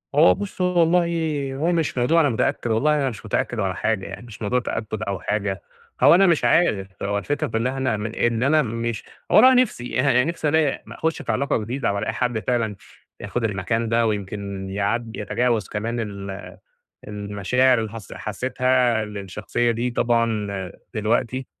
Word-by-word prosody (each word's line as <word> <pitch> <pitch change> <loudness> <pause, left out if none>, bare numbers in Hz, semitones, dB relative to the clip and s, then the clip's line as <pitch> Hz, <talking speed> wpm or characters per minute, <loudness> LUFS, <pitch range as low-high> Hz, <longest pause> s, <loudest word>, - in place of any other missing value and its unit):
هو 155 +3 +7
بُص، 200 -2 -6
هو 180 -1 +2
والله 165 -5 +1
هو 160 +5 0
مش 165 -6 0
موضوع 155 +8 +4
أنا 145 - +3
متأكّد، 115 0 0
والله 150 +8 +3
أنا 140 -3 +1
مش 115 -2 -9
متأكّد 110 +2 -1
ولا 95 -3 0
حاجة 110 +1 -1
يعني، - - -8
مش 110 -2 -12
موضوع 120 +4 +1
تأكُّد 110 -3 -4
أو 100 -3 -3
حاجة. 100 0 -2 0.4
هو - - +8
أنا 195 +2 +5
مش 170 -3 +2
عارف، 105 - +3 0.2
هو 100 +1 0
الفكرة 145 +8 -2
في 115 - -2
إن 115 +3 0
إحنا 130 -4 -1
من 110 +2 -5
إن 120 0 +1
أنا 155 +3 +4
مش 115 -2 -3 0.3
والله 260 +1 +7
نِفسي 125 - +1
اها 125 -2 +4
نِفسي 165 -2 -1
ألاقي 155 -2 +1
م - - -10
أخُش 160 0 -2
في - - -2
علاقة 140 +2 0
جديدة، 115 0 -2
وألاقي 100 - -2
حد 125 -3 -1
فعلًا 115 -2 -1 0.5
ياخد 120 - -3
المكان 110 +2 -1
ده، 115 0 +2
ويمكن 100 -2 -4
يعد 110 +4 -2
يتجاوز 110 +1 0
كمان 115 +3 -3
ال 100 -2 -6 0.6
المشاعر 105 +5 +1
اللي 110 -1 -3
حس 110 -2 -10
حسّيتها 125 +1 0
للشخصية 105 +3 -2
دي 120 +2 -1
طبعًا 115 -3 +1 0.5
دلوقتي. 115 +4 0
115 Hz, 175 wpm, -23 LUFS, 105-135 Hz, 0.6 s, هو